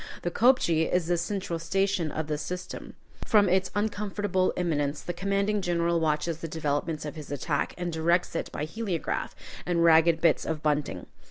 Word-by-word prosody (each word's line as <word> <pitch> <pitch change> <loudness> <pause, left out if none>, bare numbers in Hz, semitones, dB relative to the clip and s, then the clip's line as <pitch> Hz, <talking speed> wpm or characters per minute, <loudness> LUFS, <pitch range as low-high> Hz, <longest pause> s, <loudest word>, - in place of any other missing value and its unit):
The 175 - -1
kopje 170 -9 +3
is 180 -2 +2
the 175 +1 +1
central 175 -1 -2
station 190 -1 0
of 160 - -3
the 150 -1 -2
system. 180 +5 -6 0.3
From 210 -2 +4
its 185 +1 +2
uncomfortable 205 -3 0
eminence 150 -4 0
the 175 - -3
commanding 200 +3 0
general 170 -2 +1
watches 160 +1 0
the 165 - -5
developments 155 0 -2
of 150 - -5
his 155 -3 -9
attack, 145 +1 -1
and 175 -1 -3
directs 170 +2 +1
it - - -3
by 150 - -3
heliograph 190 -1 -3 0.3
and 170 -1 +1
ragged 165 0 +5
bits 165 -1 +3
of 155 -1 -3
bunting. 145 - -1
170 Hz, 170 wpm, -27 LUFS, 155-185 Hz, 0.3 s, ragged